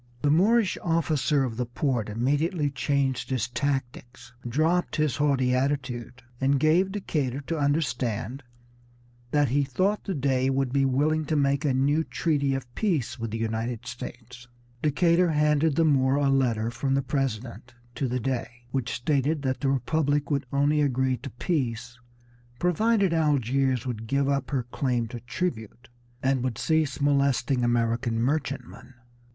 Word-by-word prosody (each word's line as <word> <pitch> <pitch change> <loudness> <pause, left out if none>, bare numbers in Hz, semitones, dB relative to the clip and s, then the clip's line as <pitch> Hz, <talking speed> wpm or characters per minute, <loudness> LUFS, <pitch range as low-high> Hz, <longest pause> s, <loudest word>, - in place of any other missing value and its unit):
The 145 - +3
Moorish 205 +6 +3
officer 155 -4 +1
of 115 -4 -3
the 125 - -1
port 120 -3 -1
immediately 145 - 0
changed 135 0 -1
his 125 -4 0
tactics, 125 -2 -4 0.2
dropped 160 +7 +1
his 155 -4 0
haughty 135 -4 +2
attitude, 125 -2 -2 0.2
and 135 +1 +2
gave 170 +6 +3
Decatur 145 -9 -2
to 160 +3 -3
understand 135 -4 -1 0.9
that 145 0 +2
he 140 +3 +2
thought 185 +10 0
the 190 - -2
Dey 130 -2 +1
would 135 -1 0
be 140 -1 +3
willing 150 +4 +1
to 155 - -1
make 140 -1 +2
a 145 - +2
new 145 +4 +2
treaty 140 -5 0
of 125 -2 -6
peace 165 - -1
with 115 0 -3
the 110 - -4
United 115 +1 -3
States. 125 0 -9 0.3
Decatur 170 +4 +3
handed 150 0 +2
the 165 - +3
Moor 135 -3 +3
a 140 -1 +2
letter 120 -4 +1
from 135 +3 -1
the 140 - +1
President 125 -3 -3 0.2
to 135 - -2
the 125 +1 -1
Dey, 125 0 -2 0.2
which 130 -3 -2
stated 145 +3 0
that 130 -1 -1
the 140 - +1
Republic 145 +2 0
would 140 -2 0
only 145 +2 +2
agree 130 -2 +1
to 135 +3 -8
peace 120 -4 -3 0.6
provided 195 - +2
Algiers 135 -5 +1
would 115 -3 -4
give 140 +3 +1
up 140 -2 0
her 135 -4 -1
claim 125 -5 0
to 120 - -6
tribute 120 - -4 0.3
and 130 -1 +1
would 125 -3 -2
cease 155 -3 0
molesting 140 -3 +2
American 115 0 +1
merchantmen. 130 -1 -3
135 Hz, 155 wpm, -26 LUFS, 125-150 Hz, 0.9 s, The